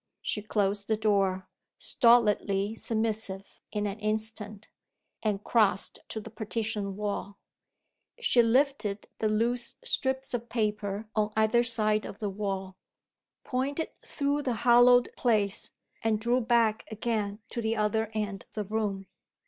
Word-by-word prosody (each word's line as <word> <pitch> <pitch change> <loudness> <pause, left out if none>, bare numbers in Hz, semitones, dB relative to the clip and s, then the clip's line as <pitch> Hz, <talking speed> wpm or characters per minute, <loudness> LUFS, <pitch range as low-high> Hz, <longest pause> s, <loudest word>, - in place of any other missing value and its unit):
She 210 - -1
closed 205 -1 0
the 220 - +1
door, 195 -3 +1 0.3
stolidly 210 -4 +3
submissive 220 -4 -2
in 210 -1 -1
an 205 +1 -3
instant; 215 -1 -3 0.5
and 210 -2 -1
crossed 205 -5 +2
to 220 - -4
the 220 +1 -10
partition 215 -2 -3
wall. 200 -1 -4 0.8
She 255 - +4
lifted 235 -4 +1
the 215 - +1
loose 235 +3 0
strips 265 - -1
of 240 0 -3
paper 210 -2 -2
on 215 -1 +1
either 220 +2 +4
side 215 -3 +1
of - - -9
the 210 -2 -3
wall 195 -2 -4 0.7
pointed 280 +5 -2
through 285 0 -1
the 255 -4 -1
hollowed 245 0 +7
place 210 -5 +1 0.3
and 220 -1 +2
drew 240 +3 +2
back 230 -2 +2
again 215 -2 -2
to 235 - -3
the 225 0 0
other 215 0 0
end 205 -3 -2
of - - -32
the 210 - -1
room. 205 -2 -2
215 Hz, 135 wpm, -29 LUFS, 205-235 Hz, 0.8 s, hollowed